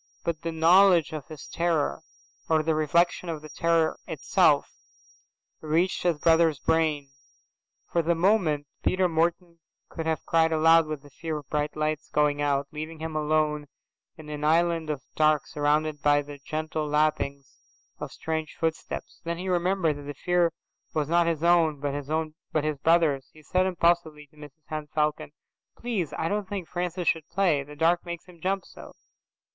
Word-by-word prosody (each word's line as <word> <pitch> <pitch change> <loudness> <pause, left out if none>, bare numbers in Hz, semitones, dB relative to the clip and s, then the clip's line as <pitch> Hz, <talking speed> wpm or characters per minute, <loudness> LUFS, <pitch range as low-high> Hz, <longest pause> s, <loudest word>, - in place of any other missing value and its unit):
But 170 -2 -2
the 165 - -3
knowledge 170 0 +5
of 150 -4 -6
his 155 -3 -10
terror, 165 -3 -1 0.5
or 160 -1 +3
the 160 +1 +1
reflection 170 +3 +1
of 155 -2 -5
the 155 - -10
terror 165 0 +1
itself, - - +2 0.9
reached 165 +4 0
his 175 -3 +1
brother's 160 -1 +3
brain. 150 -2 0 0.8
For 170 - +2
the 170 +1 +1
moment, 165 -5 +2 0.2
Peter 185 0 +2
Morton 170 +1 -1 0.3
could 160 -1 -5
have 160 -2 -1
cried 165 0 +3
aloud 165 0 +5
with 155 -2 -5
the 145 - -16
fear 160 +2 -4
of 145 - -10
bright 150 0 -1
lights 155 0 -2
going 145 -1 +1
out, 140 -1 0
leaving 155 +1 -6
him 160 0 -5
alone 150 -1 0 0.5
in 155 -2 -11
an 150 0 -5
island 165 0 +2
of 145 -4 -3
dark 155 -2 +3
surrounded 150 0 0
by 145 0 +3
the 145 0 -10
gentle 155 +1 -3
lappings 150 -2 0 0.5
of - - -6
strange 160 -1 -4
footsteps. 160 -1 -4
Then 170 0 -3
he 185 +2 -4
remembered 175 -3 +1
that - - -9
the 145 - -5
fear 175 +2 +1 0.4
was 150 -1 0
not 170 0 +3
his 165 -1 -1
own, 165 -4 +3
but 155 +2 -3
his 155 -1 -1
brother's. 160 -4 +2
He 155 - -18
said 185 +5 +1
impulsively 170 -4 +1
to - - -25
Mrs 150 +1 -14
Henne 155 -1 -5
Falcon, 150 0 -1 0.5
"Please, 215 -10 -2
I 160 - -1
don't 205 +1 -2
think 195 -5 -4
Francis 180 0 -3
should 160 -1 +1
play. 170 -5 +2
The 145 +2 -11
dark 165 +3 +2
makes 170 -1 -7
him 175 -2 -17
jump 195 +1 -1
so." - - -13
160 Hz, 170 wpm, -26 LUFS, 150-170 Hz, 0.9 s, knowledge